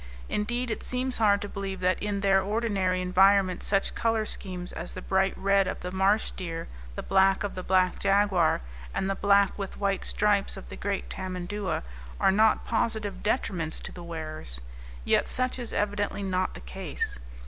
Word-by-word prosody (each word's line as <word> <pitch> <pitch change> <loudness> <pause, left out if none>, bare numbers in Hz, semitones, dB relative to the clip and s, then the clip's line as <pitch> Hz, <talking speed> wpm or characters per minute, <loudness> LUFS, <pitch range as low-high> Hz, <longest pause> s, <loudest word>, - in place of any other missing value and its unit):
Indeed, 240 +3 -1
it - - -3
seems 255 0 -1
hard 205 -2 +4
to - - -4
believe 195 -2 -5
that 185 -1 +1
in 205 -1 -1
their 195 -1 +4
ordinary 195 -3 0
environments 185 0 +4
such 195 -1 +2
color 225 -1 +1
schemes 180 -4 -4
as 165 +2 -6
the 185 - -5
bright 190 0 +1
red 195 -1 +3
of - - -4
the 180 - -4
marsh 195 +3 +2
deer, 165 -3 -5 0.3
the - - -5
black 190 0 +3
of 205 - -3
the 185 - -5
black 185 0 +2
jaguar, 195 - +3 0.3
and 190 - 0
the 195 - +1
black 200 0 +3
with 195 -1 -5
white 195 -1 0
stripes 205 -2 +2
of 195 - -10
the - - -7
great 200 -1 -3
tamandua, 185 - -3 0.4
are - - +5
not 215 +2 +3
positive 220 -4 -1
detriments 180 -7 -1
to - - -5
the 175 - -9
wearers. 155 - -6 0.5
Yet - - +3
such 255 0 -1
is 240 - -4
evidently 205 -1 -1
not 185 - -1
the - - -8
case. - - -4
195 Hz, 180 wpm, -28 LUFS, 185-205 Hz, 0.5 s, are